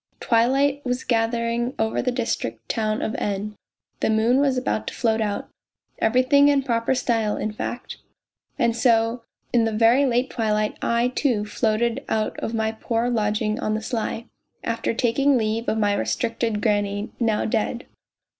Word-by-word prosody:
Twilight 270 +5 +2
was 250 0 -2
gathering 235 +1 0
over 220 0 0
the 250 - 0
district 115 - -3
town 215 -1 -1
of 220 - -2
N., 205 +1 -3 0.4
the - - +1
moon 225 +4 +3
was 275 -2 +2
about 250 -3 -1
to - - -4
float 225 -2 +1
out... 205 -2 -2 0.5
everything 255 +5 +4
in 285 -1 +3
proper 235 0 0
style, 225 -4 0
in 215 - -2
fact. 240 +3 -5 0.6
And 235 -4 +2
so 230 0 +2 0.3
in 235 -2 +4
the 225 - 0
very 230 +6 +4
late 245 +1 0
twilight 215 -2 0
I, 235 +1 +1
too, 250 -5 0
floated 225 +2 0
out 215 -1 0
of 225 - -3
my 220 0 0
poor 230 +2 -1
lodging 215 -1 0
on 215 - -1
the - - -1
sly 230 -1 -3 0.4
after 230 0 -1
taking 265 +4 +2
leave 225 +1 -1
of 220 - 0
my 205 -2 +2
restricted 230 0 -1
granny, 205 -1 0
now 225 -3 +1
dead. 225 +2 -1
230 Hz, 160 wpm, -23 LUFS, 215-245 Hz, 0.6 s, everything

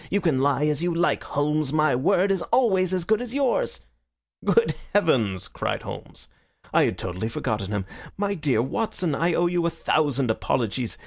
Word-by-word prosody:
You 200 - +1
can 155 -9 +1
lie 140 +1 +2
as 150 0 0
you 175 0 0
like, 170 +1 +1
Holmes. 150 0 -1
My 155 -3 +3
word 190 +9 +2
is 190 -2 0
always 195 -7 +3
as 185 -2 0
good 220 +6 +1
as 245 +1 -6
yours." 275 -3 0 0.6
"Good 200 -3 +3 0.2
heavens!" 115 - +2
cried - - -3
Holmes. - - -9 0.5
"I - - +5
had - - -2
totally 95 +4 -4
forgotten 110 -4 -3
him. 100 -2 -2 0.3
My 200 0 0
dear 145 - +1
Watson, 175 - -2
I 165 +4 +1
owe 175 - +2
you 175 0 +1
a - - +2
thousand 145 -6 0
apologies. 115 +1 -1
155 Hz, 180 wpm, -24 LUFS, 130-190 Hz, 0.6 s, I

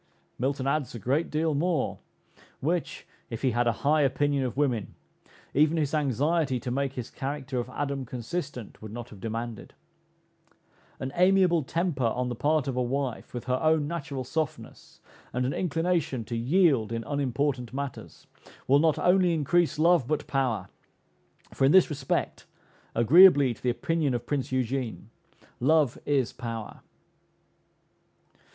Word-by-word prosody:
Milton 135 +1 -1
adds 140 -2 -1
a - - -4
great 135 - 0
deal 155 +1 0
more, 160 0 0 0.6
which, 170 +4 -2 0.2
if 115 0 -6
he 130 - +3
had 120 +1 +1
a - - +4
high 150 +1 +4
opinion 140 0 +1
of 125 0 -4
woman, 125 -8 0 0.6
even 155 +3 +3
his 150 -2 0
anxiety 145 0 +1
to 120 - -5
make 135 +1 -1
his 125 -4 -6
character 135 -1 -4
of 120 +1 -4
Adam 140 0 -3
consistent 125 - -6
would 110 -1 -8
not 120 +1 -7
have 105 - -12
demanded. 115 -1 -5 1.2
An 130 - -4
amiable 180 -2 +4
temper 160 -2 -1
on 125 +2 -1
the 120 - -3
part 150 +3 +1
of 135 - -2
a 125 - 0
wife, 130 0 -3
with 120 - -5
her 130 0 0
own 155 -2 +2
natural 145 -5 -4
softness, 155 +3 -5 0.3
and 125 +2 0
an 130 - -1
inclination 165 -6 -1
to 120 - -4
yield 130 - +2
in 115 0 -3
unimportant 135 -3 -1
matters, 140 0 -7 0.4
will 140 +2 +5
not 160 -1 +3
only 180 -1 +3
increase 165 +2 +1
love, 165 -4 +4
but 155 +1 -1
power; 120 -9 -1 0.9
for - - -1
in 135 - +5
this 185 -2 +6
respect, 135 -3 -2 0.5
agreeably 140 - +7
to - - -18
the 125 - 0
opinion 145 +2 0
of 120 - -4
Prince 140 -3 -2
Eugene, 125 -3 -2 0.5
love 150 0 +2
is 135 -5 +1
power. 115 -3 -6
135 Hz, 150 wpm, -27 LUFS, 125-155 Hz, 1.2 s, agreeably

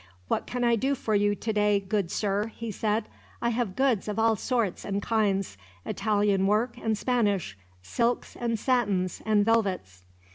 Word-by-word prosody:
"What - - -1
can 245 0 -2
I 235 -1 +4
do 270 +5 0
for 220 -4 -2
you 205 0 +3
today, 210 -1 +1
good 195 -2 -1
sir?" 205 +2 0
he 230 -1 -5
said. 215 +2 -1 0.3
"I 235 - 0
have 230 -5 -1
goods 255 -6 +1
of 210 0 -3
all 225 0 +3
sorts 230 -3 -1
and 200 0 -2
kinds: 200 - 0 0.3
Italian 205 -2 +1
work 220 +4 +1
and 220 -1 -1
Spanish; 205 - 0 0.3
silks, 235 - -1
and 235 -1 -1
satins, 205 -7 0
and 210 -1 +3
velvets." 190 - 0
210 Hz, 160 wpm, -27 LUFS, 200-230 Hz, 0.3 s, I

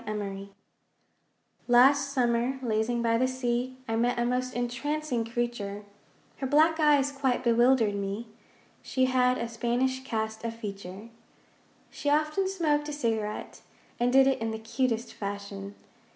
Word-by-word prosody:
SMOKE 200 -2 -4 1.2
Last 270 +3 +5
summer, 245 0 +1
lazing 235 +1 0
by 230 0 +2
the 255 - +3
sea, 255 0 -2
I 225 - -1
met 240 +2 +1
a 240 - +1
most 255 +1 -1
entrancing 255 +2 -2
creature, 230 -3 -3 0.5
Her 270 - -3
black 315 +4 +4
eyes 290 -2 +4
quite 270 -3 0
bewildered 235 -2 +4
me 200 +3 -3 0.6
She 260 -1 +1
had 255 0 +2
a 235 - -2
Spanish 245 +3 -1
cast 220 -3 -3
of 230 0 -3
feature. 200 -1 -8 0.8
She 290 - -2
often 305 +6 +1
smoked 305 -6 0
a - - -4
cigarette, 225 -6 -3 0.4
And 245 +1 +2
did 270 +1 +6
it 270 -3 +1
in 225 - -1
the 220 - -3
cutest 230 +1 -2
fashion. 200 0 -6
240 Hz, 140 wpm, -28 LUFS, 225-265 Hz, 1.2 s, did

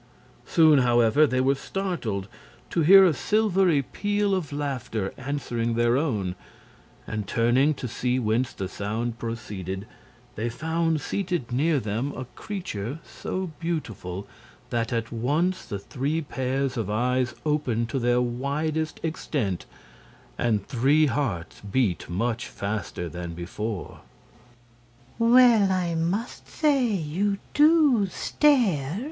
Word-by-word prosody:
Soon, 155 -4 +6
however, 120 +4 +4
they 130 -1 +1
were 135 +1 +3
startled 135 - -3 0.4
to 170 - +1
hear 190 +5 +8
a 175 - +4
silvery 190 - +2
peal 205 +6 0
of 175 -6 -2
laughter 130 -8 -3
answering 120 -4 -2
their 120 +1 +3
own, 110 - 0 0.7
and 105 -2 -4
turning 125 +7 +3
to 130 - -5
see 125 +2 -1
whence 120 +1 0
the 95 - -5
sound 110 +4 -3
proceeded, 100 -5 -5 0.5
they 115 +3 -2
found 160 +4 -1
seated 175 -8 -2
near 145 +4 +2
them 115 +6 -2
a 130 - -6
creature 150 - -5
so 185 -2 -5
beautiful 110 - -4 0.5
that 115 -1 -1
at 115 -1 -2
once 150 +11 0
the 100 - -4
three 140 +9 -2
pairs 135 -2 -2
of 110 -4 -2
eyes 125 +2 0
opened 130 -7 0
to 135 - -1
their 120 0 +2
widest 145 +6 -2
extent, 140 - -2 0.7
and 110 -4 0
three 140 +5 +3
hearts 115 - -2
beat 100 -4 -1
much 115 +6 -1
faster 100 -3 -4
than 85 0 -6
before. 90 +2 -5 1.2
"Well, 230 -4 +6
I 180 -2 0
must 175 +8 -2
say 285 -5 +2
you 195 +1 -1 0.2
DO 295 -8 +5
stare!" 190 - +2
130 Hz, 125 wpm, -26 LUFS, 115-165 Hz, 1.2 s, hear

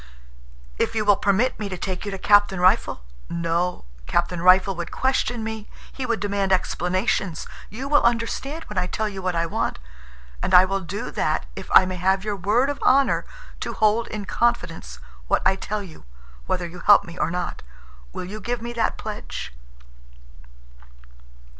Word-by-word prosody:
"If - - 0
you 215 -1 0
will 205 -1 +6
permit 205 +7 +1
me 210 -2 -3
to 185 - -5
take 185 +2 -4
you - - -3
to 195 - -4
Captain 205 -1 +4
Rifle—" 185 - +2 0.3
"No. 170 - -1 0.2
Captain 175 0 0
Rifle 185 +2 +5
would 175 0 -5
question 245 -3 0
me. 220 -1 -5 0.2
He 260 -2 -4
would 235 -1 0
demand 200 -1 -1
explanations. 185 0 0 0.2
You 250 +8 -6
will 290 +1 +4
understand 240 +7 -1
when 210 -9 -3
I 180 - -1
tell 215 +3 -2
you 195 -2 -6
what 185 -1 -1
I 165 0 +1
want. 165 - -2 0.6
And 185 - +2
I 180 +1 +9
will 195 +1 -1
do 195 +3 -5
that - - 0
if - - -8
I 185 - +8
may 185 0 -4
have 190 +2 +1
your 210 -1 -1
word 215 +9 +2
of 285 - -7
honor 270 +1 +3 0.3
to - - -4
hold 220 +1 +2
in 210 -2 -5
confidence 175 - -1 0.3
what - - +1
I 190 - +4
tell 210 +2 -4
you, 165 - -13 0.4
whether 180 -1 -1
you 175 +1 -9
help 205 +4 +6
me 170 - -10
or 150 - +1
not. 180 +1 -4 0.5
Will - - -5
you 210 +4 -7
give 240 +3 -2
me 235 +1 -6
that 230 -1 0
pledge?" 210 - -6
195 Hz, 180 wpm, -23 LUFS, 180-220 Hz, 0.6 s, I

